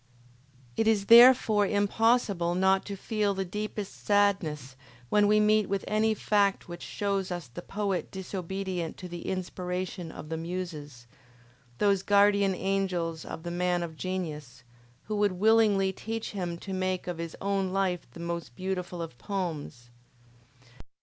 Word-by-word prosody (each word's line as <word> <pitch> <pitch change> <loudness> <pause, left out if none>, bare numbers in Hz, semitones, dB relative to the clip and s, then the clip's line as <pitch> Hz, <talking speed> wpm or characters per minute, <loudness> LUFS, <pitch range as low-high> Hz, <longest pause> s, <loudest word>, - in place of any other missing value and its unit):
It 225 - +1
is 210 -3 +3
therefore 230 -3 +7
impossible 205 -4 +2
not 190 +1 +3
to 200 - -5
feel 210 -1 -1
the 195 0 -2
deepest 210 +1 -5
sadness 175 -10 +1 0.3
when 210 -1 +4
we 210 +1 +4
meet 215 -1 +3
with 195 -1 -1
any 215 +1 +2
fact 200 -1 +1
which 175 0 -8
shows 195 -2 -2
us 175 -5 -4
the 120 +9 -9
poet 200 -1 -2
disobedient 190 -2 -4
to 185 - -7
the 175 -1 -7
inspiration 180 -1 -4
of 155 - -9
the 160 - -3
Muses, 160 -7 -6 0.7
those 200 -2 +3
guardian 200 -1 +4
angels 180 -4 -1
of 160 - -7
the 170 - -4
man 175 0 0
of 160 -2 -6
genius, 150 -8 -5 0.4
who 215 - -4
would 205 -2 +2
willingly 205 -1 +3
teach 225 +3 -5
him 175 -4 -4
to 195 +3 -7
make 185 -1 -1
of 175 -2 -5
his 165 -1 -5
own 195 -1 -1
life 185 -2 -1
the - - -13
most 170 -6 -5
beautiful 180 -1 -3
of 160 -7 -10
poems. 155 -10 -5
190 Hz, 150 wpm, -28 LUFS, 175-205 Hz, 0.7 s, therefore